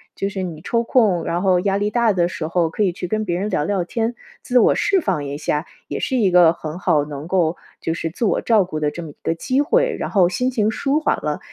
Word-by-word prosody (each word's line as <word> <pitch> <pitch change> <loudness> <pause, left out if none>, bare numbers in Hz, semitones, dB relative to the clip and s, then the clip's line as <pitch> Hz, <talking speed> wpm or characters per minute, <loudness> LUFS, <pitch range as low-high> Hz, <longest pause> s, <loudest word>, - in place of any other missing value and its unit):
就 195 - -2
是 195 -1 -4
你 165 -4 -6
抽 230 +5 0
空， 215 -8 +2
然 175 +1 -2
后 185 -2 +3
压 195 0 +1
力 205 +1 0
大 235 -3 +3
的 175 -2 +2
时 165 -2 -4
候， 170 -1 +1
可 190 - -4
以 185 - +2
去 180 +1 -6
跟 215 +3 -1
别 175 -2 -1
人 200 +3 -2
聊 150 - 0
聊 185 +2 0
天， 230 +5 -2 0.3
自 250 - 0
我 - - +5
释 390 -2 +2
放 180 - -1
一 140 +1 -4
下， 150 +1 -2 0.2
也 - - -4
是 265 - -1
一 200 -6 +3
个 175 -2 +6
很 160 +1 -7
好 150 -5 +2
能 145 +1 -7
够， 175 -2 +1 0.2
就 165 - -2
是 165 -1 -3
自 205 +8 -3
我 - - +1
照 220 -4 +3
顾 155 -4 -5
的 150 - +1
这 170 +3 -7
么 155 - -8
一 - - -15
个 165 - 0
机 260 - 0
会。 - - +2
然 - - -3
后 185 -4 +3
心 250 +8 0
情 220 -4 +1
舒 280 +6 0
缓 310 - +1
了， 150 -1 -2
185 Hz, 290 characters per minute, -20 LUFS, 165-225 Hz, 0.3 s, 个